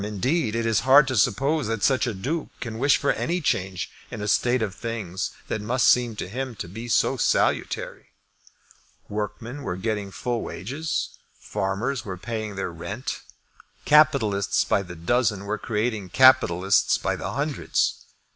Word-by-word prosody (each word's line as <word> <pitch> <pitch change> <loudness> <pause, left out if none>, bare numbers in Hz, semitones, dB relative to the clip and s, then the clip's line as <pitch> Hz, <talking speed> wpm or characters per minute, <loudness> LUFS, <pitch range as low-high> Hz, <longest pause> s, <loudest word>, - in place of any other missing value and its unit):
Indeed 110 - -1
it 115 0 -1
is 115 -3 +2
hard 135 +6 +6
to 130 - -1
suppose 130 +6 +2
that 115 -2 -2
such 130 -1 +3
a 120 - -1
Duke 145 - -3
can 115 -2 -5
wish 140 +2 +4
for 140 - +1
any 175 +2 -1
change 95 - -1 0.2
in - - -7
a 105 - -3
state 120 +3 +2
of 100 -3 -3
things 100 -4 -4 0.2
that 110 - -2
must 120 +4 +1
seem 120 -3 +4
to 105 - -5
him 130 +4 -4
to 90 - -6
be 115 +7 -7
so 115 - +2
salutary. - - 0 1.0
Workmen 110 +6 -5
were 90 -9 -3
getting 105 +1 -2
full 120 +4 -3
wages. 140 - -4 0.2
Farmers 110 +7 -2
were 95 -3 -6
paying 110 +1 -5
their 95 -2 -3
rent. 100 +9 -5 0.6
Capitalists 110 -10 +4
by - - +2
the 90 -2 -9
dozen 100 +3 0
were 105 +1 -2
creating 110 -3 -2
capitalists 100 -6 +4
by - - -1
the - - -5
hundreds. 145 +1 -1
115 Hz, 160 wpm, -24 LUFS, 100-130 Hz, 1.0 s, hard